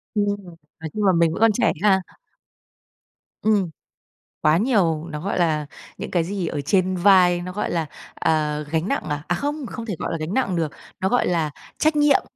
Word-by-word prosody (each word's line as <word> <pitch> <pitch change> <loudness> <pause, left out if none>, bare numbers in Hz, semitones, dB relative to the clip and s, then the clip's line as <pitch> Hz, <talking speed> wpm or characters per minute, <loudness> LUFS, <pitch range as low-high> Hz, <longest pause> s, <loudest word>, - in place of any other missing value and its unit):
Ưm, 205 -1 +2
ừm, 200 -4 -4 0.2
nói 160 -1 -5
chung 210 - -2
là 190 - +6
mình 165 -1 +3
vẫn - - -5
còn 225 -1 +6
trẻ 245 - +2
ha. 195 -2 +4 1.4
Ừm. 205 -5 +2 0.7
Quá 155 +2 +4
nhiều, 180 -9 +2
nó, 150 -2 -6
gọi 195 -1 -2
là, 155 -3 +1 0.3
những - - -6
cái 175 -2 +2
gì 185 -1 -3
ở 145 - -2
trên 185 +4 +1
vai, 180 -2 +5
nó, 180 +1 -5
gọi 210 - -2
là, 165 -2 0 0.3
à, 150 -2 +1
gánh 165 +3 0
nặng 275 - -1
à? 150 0 -3
À, 175 - +1
không, 290 - -3
không 230 -1 -6
thể, 205 -6 -3
gọi - - -3
là, 165 - -2
gánh 155 +5 -4
nặng 245 -9 +1
được, 160 -4 -1 0.3
nó, 190 - +1
gọi 245 - +2
là, 160 -4 0 0.3
trách 310 0 +2
nhiệm, 295 -1 +4
180 Hz, 210 wpm, -23 LUFS, 160-210 Hz, 1.4 s, là